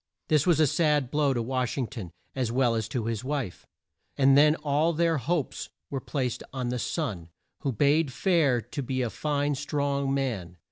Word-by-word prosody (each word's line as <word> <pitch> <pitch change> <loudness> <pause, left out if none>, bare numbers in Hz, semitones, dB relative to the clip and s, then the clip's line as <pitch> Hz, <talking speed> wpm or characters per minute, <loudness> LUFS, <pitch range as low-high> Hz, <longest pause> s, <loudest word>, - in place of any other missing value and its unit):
This 155 0 +3
was 170 -4 +4
a 155 - +6
sad 150 -3 +2
blow 145 -2 +2
to 120 -3 0
Wash 130 +1 -1
ing 130 - 0
ton, 110 -8 -7 0.3
as 125 -4 -1
well 125 -1 +2
as 110 -2 -1
to 115 -1 -3
his 115 -1 -2
wife, 135 -9 -4 0.5
and 135 0 +5
then 150 +2 +6
all 150 +2 +1
their 165 -1 +2
hopes 150 +3 -2 0.2
were 135 -2 -2
placed 130 -5 -2
on 125 -2 -3
the 125 0 -2
son, 105 - -3 0.3
who 140 - -1
bade 145 +5 +2
fair 150 -7 +2
to 125 +6 -6
be 130 0 -1
a 115 - -2
fine 145 -1 0
strong 140 -1 -1
man. 110 -11 -2
135 Hz, 190 wpm, -27 LUFS, 125-150 Hz, 0.5 s, a